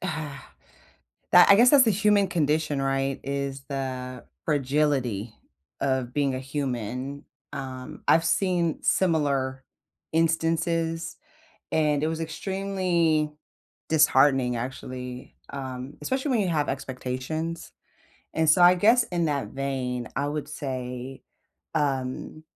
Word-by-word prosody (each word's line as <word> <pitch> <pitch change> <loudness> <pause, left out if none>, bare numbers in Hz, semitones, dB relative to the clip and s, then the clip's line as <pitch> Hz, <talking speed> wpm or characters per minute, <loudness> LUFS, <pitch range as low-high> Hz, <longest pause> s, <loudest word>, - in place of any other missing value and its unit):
that 155 -6 -4 1.1
I 200 - +9
guess 240 +3 +7
that's 270 -5 +7
a - - +5
human 205 0 +3
condition, 150 -3 0
right, 135 0 0
is 140 0 -3
the 130 -2 -4 0.2
fragility 135 -7 0 0.4
of 130 -3 -1
being 140 -2 +1
a - - -3
human, 130 0 -4 0.3
um, 130 -2 -7
I've 165 +1 +5
seen 175 -2 +1
similar 140 -7 +1 0.5
instances, 165 0 0 0.6
and 150 -2 +2
it 155 - +2
was 160 0 -3
extremely 170 -2 0 0.6
disheartening, 135 -5 +4
actually, 125 0 -6 0.2
um, 130 0 -6
especially 265 +2 -1
when 240 -4 +2
you 190 - 0
have 150 -3 0
expectations, 135 +5 -4 0.6
and 160 -1 +1
so 175 - +4
I 175 +1 +8
guess 230 +6 +4
in 175 -2 -1
that 145 -2 -1
vein, 130 -3 -3
I 140 +1 -1
would 150 0 -4
say, 130 -2 -5 0.5
um, 140 +1 -2
145 Hz, 115 wpm, -26 LUFS, 130-165 Hz, 1.1 s, I